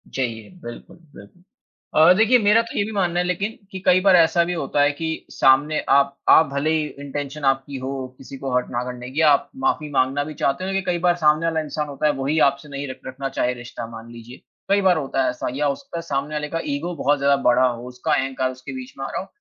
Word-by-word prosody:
चाहिए, 115 -5 -3
बिल्कुल, 120 +7 -10 0.2
बिल्कुल। 100 - -15 0.5
अ, 160 +3 +7
देखिए 225 +3 +5
मेरा 210 +1 +4
तो 230 - -8
ये - - +2
भी 220 - -6
मानना 175 -3 0
है 180 - +1
लेकिन 195 +5 -2
कि 190 - -6
कई 180 - +5
बार 190 -1 +5
ऐसा 170 0 +4
भी 180 - -2
होता 145 -3 -1
है 145 0 +4
कि 160 +2 -5
सामने 145 +3 +3
आप 140 0 +4
आप 160 - +7
भले 140 +2 -1
ही 155 -1 +1 0.2
इंटेंशन 145 +1 -5
आपकी 135 +1 0
हो 130 +1 -5 0.3
किसी 135 +1 -10
को 135 0 -5
हर्ट 125 - 0
ना 120 0 -2
करने 125 0 -7
की, 150 +5 -1
आप 145 -3 +4 0.2
माफी 150 -2 0
माँगना 135 +1 +1
भी 155 +1 -7
चाहते 140 +2 -1
हों 190 +1 -3
लेकिन 195 0 -1
कई 175 - -2
बार 175 -1 +4
सामने 155 -1 +2
वाला 160 -1 0
इंसान 150 0 -4
होता 140 +1 -3
है, - - +4
वो 135 -1 -4
ही 155 +2 +1
आपसे 140 +2 -11
नहीं 140 0 -5
रख - - -11
रखना 135 +1 -5
चाहे 125 -1 -1
रिश्ता, 120 -1 -8
मान 115 0 -11
लीजिए, 120 +1 -11 0.3
कई 200 +1 +3
बार 185 -3 +4
होता 135 -2 -1
है 130 - +1
ऐसा 125 - -4
या 145 +1 0
उसका 170 - -5
सामने 145 -1 -3
वाले 150 0 -2
का 165 - -2
ईगो 170 +5 -4
बहुत 145 -1 +1
ज़्यादा 140 0 +3
बड़ा 125 +1 +4
हो, 120 0 -5
उसका 125 +5 -2
अहंकार 130 -1 0
उसके 130 - -9
बीच 260 0 -8
में - - -4
आ - - -5
रहा - - -3
हो। - - -10
145 Hz, 250 wpm, -22 LUFS, 130-165 Hz, 0.5 s, अ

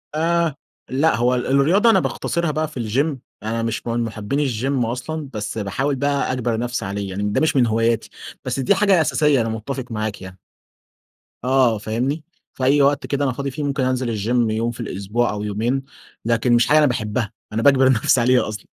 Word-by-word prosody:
آآ، 165 -1 +1 0.3
لأ 145 +5 +2
هو 125 +2 +2
ال 125 - -2
الرياضة 160 - +4
أنا 225 - +5
باختصرها 170 -2 -1
بقى 155 +1 -1
في 150 -4 -8
الgym 140 +6 0 0.3
أنا 115 +1 -2
مش 115 +1 -3
من 115 0 0
محبين 110 +4 -3
الجيم 130 -1 0
أصلًا 135 +5 -4
بس 105 +1 -4
باحاول 135 +8 -1
بقى 140 0 0
أجبر 120 -3 -1
نفسي 120 -4 -2
عليه، 100 0 -4
يعني 100 +2 -4
ده 105 0 0
مش 155 -2 +2
من 125 -3 +4
هواياتي. 115 0 +1 0.4
بس 130 +1 -2
دي 135 +10 +3
حاجة 195 -3 +4
أساسية 150 -3 +2
أنا 115 - -1
متفق 120 +4 -4
معاك 110 -2 -3
يعني. 95 0 -10 1.1
آه 130 -3 +3
فاهمني؟ 125 +9 -2 0.3
في 130 - -6
أي 140 +2 +4
وقت 140 +1 +2
كده 140 0 0
أنا 130 - +1
فاضي 140 +1 -4
فيه، 150 +3 -5
ممكن 140 -2 -1
أنزل 125 -3 -1
الgym 115 +2 +1
يوم 115 +2 -1
في 120 - -12
الأسبوع 110 +2 -1
أو 105 0 -4
يومين، 115 +6 -1 0.4
لكن 115 +1 +2
مش 120 0 +4
حاجة 150 - +5
أنا 155 - +6
باحبها، 110 -3 -1 0.2
أنا 115 - 0
باجبر 135 -1 +5
نفسي 120 0 +3
عليها 125 -1 +3
أصلًا. 105 -1 -6
125 Hz, 200 wpm, -21 LUFS, 110-140 Hz, 1.1 s, أنا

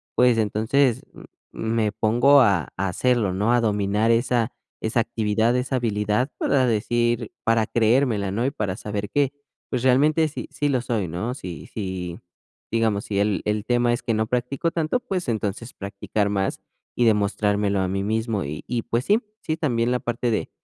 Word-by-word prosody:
pues 125 -2 +4
entonces, 110 +4 +1
m - - -13 0.3
me 110 -1 0
pongo 120 +6 +5
a 100 - +3
a 95 +1 -1
hacerlo, 115 -1 +1
¿no? 105 +5 +1
A 120 - +3
dominar 105 +1 +1
esa 120 0 +1 0.3
esa 110 +2 0
actividad, 115 0 +1
esa 125 +1 0
habilidad, 105 +2 0
para 130 -2 +2
decir 120 +1 0
para 115 -1 +3
creérmela, 115 -2 +2
¿no? 115 +5 -1
Y 135 - +1
para 100 -7 -3
saber 105 -1 -4
que, 140 +2 +1 0.4
pues, 125 -1 -2
realmente, 150 +5 +4
sí 155 - -7
sí, 145 0 -1
lo 130 -4 +1
soy, 110 -6 -1
¿no? 90 +9 -3
Si 90 -9 -8
si 95 -4 -5 0.5
Digamos, 110 -3 +1
si 100 -2 -1
el 105 -1 +1
el 105 0 0
tema 120 +1 +2
es 120 - -2
que 115 - 0
no 110 0 +1
practico 125 +7 -1
tanto, 165 +9 0
pues 185 - -3
entonces, 110 +1 -3
practicar 100 +1 -2
más, 95 -1 -1 0.4
y 120 - +2
demostrármelo 105 -1 +1
a 95 - +1
mí 95 +1 -2
mismo. 110 -1 -1
Y 75 +2 -6
y 120 -2 -1
pues 120 +3 -2
sí, 215 +3 +3 0.2
sí 155 - -2
también, 125 -7 0
la 125 - +1
parte 120 0 -1
de 110 - -1
115 Hz, 180 wpm, -23 LUFS, 105-125 Hz, 0.5 s, pongo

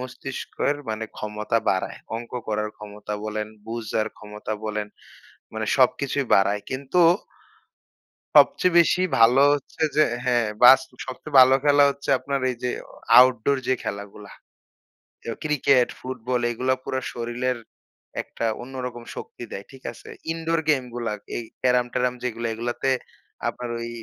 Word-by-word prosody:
মস্তিষ্কের 130 +2 -3
মানে 110 +1 -3
ক্ষমতা 105 +1 -1
বাড়ায়। 95 - -2 0.2
অঙ্ক 115 +1 -8 0.2
করার 105 0 -1
ক্ষমতা 105 0 -7
বলেন, 105 0 -3 0.2
বুঝার 110 -1 -2
ক্ষমতা 105 +1 -7
বলেন। 105 -1 -2 0.7
মানে 110 0 -2
সবকিছুই 140 +1 +2
বাড়ায়। 100 +1 +2
কিন্তু 135 +6 0 1.4
সবচেয়ে 180 -1 +5
বেশি 170 +2 +3 0.2
ভালো 120 +4 +6
হচ্ছে 145 +3 -5
যে 155 - +6 0.2
হ্যাঁ, 120 -3 +2 0.2
বাস 130 +2 +10 0.3
সবচেয়ে 135 +2 -2
ভালো 130 +1 +7
খেলা 145 0 +6
হচ্ছে 140 0 -6
আপনার 140 -1 -2
এই 125 - -6
যে 125 - 0 0.2
অ - - -20 0.3
আউটডোর 130 +2 +4
যে 130 - +4
খেলাগুলা। 100 0 -7
অ্যাউ - - -43 0.8
কেউ 115 - -4
ক্রিকেট, 140 -4 +3
ফুটবল 125 -1 -3
এগুলা 130 +2 0
পুরা 130 - -2
শরীরের 120 +2 -2 0.7
একটা - - -5 0.2
অন্যরকম 125 -2 -6
শক্তি - - -8
দেয়। 100 - -6
ঠিক 130 -1 -15
আছে? - - -14 0.2
ইনডোর 165 0 -1
গেমগুলা 120 -5 0 0.2
এই 120 - -3 0.2
ক্যারাম-ট্যারম 125 0 +2
যেইগুলা 115 -1 -2
এগুলোতে 120 +3 -1 0.6
আপনার 125 -1 -6
ওই 115 0 -5
125 Hz, 135 wpm, -24 LUFS, 110-130 Hz, 1.4 s, বাস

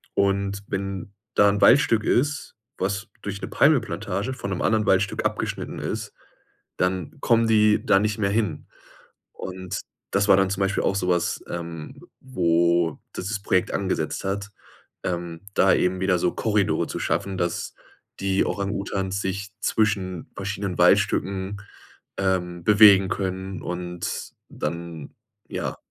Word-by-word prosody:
Und 100 0 +1
wenn 95 0 -4 0.2
da 100 - +5
'n 100 0 0
Waldstück 115 -5 +5
ist, 145 +6 0 0.2
was 100 +3 -2
durch 100 0 -5
'ne - - -4
Palmölplantage 115 - +1
von 100 -5 -5
'nem 95 - -2
anderen 110 -1 +2
Waldstück 95 +1 +2
abgeschnitten - - -2
ist, - - -4 0.6
dann 90 -3 -1
kommen 115 -1 +3
die 105 -1 +4
da 95 - +5
nicht 105 0 0
mehr 100 -2 +2
hin. 100 -7 -1 0.7
Und 95 0 -6 0.3
das 100 +1 +1
war 95 - +8
dann 95 -1 +2
zum 100 0 -2
Beispiel 95 +1 +1
auch 100 - +1
so 90 -2 -1
was, 85 -2 +1
ähm, 85 -2 -6 0.2
wo 85 - +2 0.2
das 90 - -4
das 105 -1 -2
Projekt 95 -3 +1
angesetzt 95 -1 -2
hat, 100 +2 -3 0.5
ähm, 85 -2 -3
da - - +5
eben 90 0 +1
wieder 95 -1 +2
so 90 - +1
Korridore 105 -3 +1
zu - - -4
schaffen, 95 -1 -1
dass 85 -1 -2 0.5
die 95 0 +2
Orang-Utans 100 -1 -2
sich 100 +2 -3
zwischen 95 -7 0
verschiedenen 100 -1 -3
Waldstücken, 100 +1 +2 0.6
ähm, 90 -2 -1
bewegen 100 -2 +7
können 95 0 -3
und 90 0 -4 0.2
dann, 85 -1 -5 0.3
ja, - - -3
95 Hz, 140 wpm, -24 LUFS, 90-100 Hz, 0.7 s, war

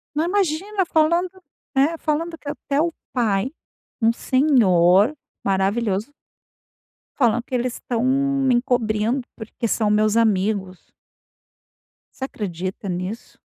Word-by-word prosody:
Não, 310 +2 +1
imagina, 380 +1 0
falando, 340 +3 +2 0.5
né, 295 +5 +3
falando 325 +2 -2
que 290 - -8
até 285 +1 -1
o 335 - +1 0.2
pai, 225 -1 +1 0.5
um 225 +1 +5
senhor 225 - +3 0.3
maravilhoso 200 +4 0 1.1
falando 240 -3 +2
que 255 - -4
eles 250 0 -1
estão 235 -1 -3
me 275 0 +2
encobrindo, 240 0 +1
porque 220 +1 -5
são 215 -1 +1
meus 210 +1 +2
amigos. 200 -4 0 1.3
Você 265 - -3
acredita 190 -4 -5
nisso? 185 +6 -5
240 Hz, 110 wpm, -22 LUFS, 210-285 Hz, 1.3 s, um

